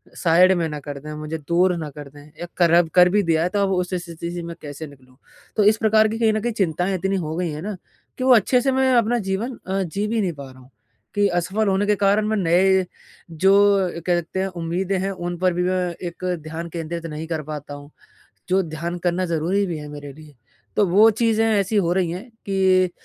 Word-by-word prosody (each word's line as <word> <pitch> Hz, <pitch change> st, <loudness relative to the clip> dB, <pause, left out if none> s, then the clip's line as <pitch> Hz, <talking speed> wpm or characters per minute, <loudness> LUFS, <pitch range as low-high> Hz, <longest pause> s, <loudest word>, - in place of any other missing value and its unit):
Side 180 Hz, +2 st, +4 dB
में 165 Hz, -1 st, 0 dB
ना 150 Hz, -1 st, -5 dB
कर 145 Hz, 0 st, -7 dB
दें, 150 Hz, +2 st, -9 dB
मुझे 155 Hz, +1 st, -5 dB
दूर 175 Hz, +4 st, +1 dB
ना 155 Hz, -2 st, -5 dB
कर 145 Hz, 0 st, -10 dB
दें 145 Hz, +1 st, -15 dB, 0.2 s
या 175 Hz, -, -4 dB
कर 170 Hz, -2 st, +4 dB
अब 170 Hz, -1 st, +4 dB
कर 180 Hz, 0 st, +7 dB
भी 205 Hz, +1 st, +2 dB
दिया 165 Hz, -1 st, +1 dB
है 180 Hz, -, 0 dB
तो 205 Hz, -, +1 dB
अब 195 Hz, -, 0 dB
उस 180 Hz, 0 st, -1 dB
स्थिति 170 Hz, -1 st, -5 dB
से 175 Hz, -1 st, -5 dB
मैं 170 Hz, 0 st, -7 dB
कैसे 150 Hz, +1 st, -7 dB
निकलूँ? 130 Hz, -2 st, -19 dB, 0.4 s
तो 210 Hz, -, +3 dB
इस 215 Hz, +1 st, +4 dB
प्रकार 220 Hz, 0 st, +4 dB
की 225 Hz, +1 st, -4 dB
कहीं 220 Hz, -2 st, +3 dB
न 215 Hz, -, -1 dB
कहीं 240 Hz, 0 st, -2 dB
चिंताएँ 180 Hz, -1 st, 0 dB
इतनी 195 Hz, +2 st, -1 dB
हो 160 Hz, -3 st, -3 dB
गई 175 Hz, -1 st, -1 dB
हैं 150 Hz, +1 st, -6 dB
ना 205 Hz, +1 st, -4 dB, 0.4 s
कि 255 Hz, -, -3 dB
वो 260 Hz, -1 st, +6 dB
अच्छे 245 Hz, +4 st, +3 dB
से 270 Hz, +1 st, +1 dB
मैं 265 Hz, 0 st, +2 dB
अपना 240 Hz, 0 st, +3 dB
जीवन 230 Hz, +6 st, -2 dB
अ, 195 Hz, +1 st, -1 dB
जी 200 Hz, +5 st, -3 dB
भी 225 Hz, 0 st, 0 dB
नहीं 180 Hz, -4 st, -1 dB
पा 140 Hz, -2 st, -10 dB
रहा 130 Hz, -, -16 dB
हूँ 130 Hz, +1 st, -18 dB, 0.5 s
कि 205 Hz, 0 st, +3 dB
असफल 190 Hz, +5 st, -1 dB
होने 195 Hz, +1 st, +1 dB
के 210 Hz, 0 st, +2 dB
कारण 205 Hz, +2 st, +2 dB
मैं 220 Hz, 0 st, 0 dB
नए 190 Hz, +1 st, +3 dB, 0.5 s
जो 190 Hz, +5 st, +3 dB, 0.5 s
कहते 175 Hz, +1 st, -1 dB
हैं 190 Hz, -, 0 dB
उम्मीदें 180 Hz, +3 st, -2 dB
हैं। 195 Hz, +1 st, -1 dB
उन 175 Hz, -1 st, -5 dB
पर 185 Hz, 0 st, +1 dB
भी 180 Hz, +1 st, -1 dB
मैं 185 Hz, 0 st, 0 dB, 0.3 s
एक 170 Hz, -, -16 dB, 0.2 s
ध्यान 165 Hz, +2 st, -6 dB
केंद्रित 165 Hz, 0 st, -5 dB
नहीं 155 Hz, 0 st, -5 dB
कर 160 Hz, -2 st, -3 dB
पाता 150 Hz, -1 st, -7 dB
हूँ, 145 Hz, 0 st, -10 dB, 0.6 s
जो 190 Hz, +1 st, +3 dB
ध्यान 170 Hz, +2 st, -5 dB
करना 180 Hz, +1 st, 0 dB
ज़रूरी 170 Hz, +5 st, 0 dB
भी 170 Hz, -4 st, -4 dB
है 150 Hz, 0 st, -8 dB
मेरे 145 Hz, -1 st, -8 dB
लिए। 150 Hz, -1 st, -15 dB, 0.4 s
तो 205 Hz, -, +4 dB
वो 210 Hz, +6 st, +6 dB
चीज़ें 225 Hz, 0 st, +1 dB
ऐसी 210 Hz, -1 st, +1 dB
हो 175 Hz, -3 st, +2 dB
रही 180 Hz, -3 st, 0 dB
हैं 200 Hz, +8 st, -7 dB, 0.2 s
कि 190 Hz, -2 st, +3 dB
180 Hz, 235 wpm, -22 LUFS, 160-200 Hz, 0.6 s, कर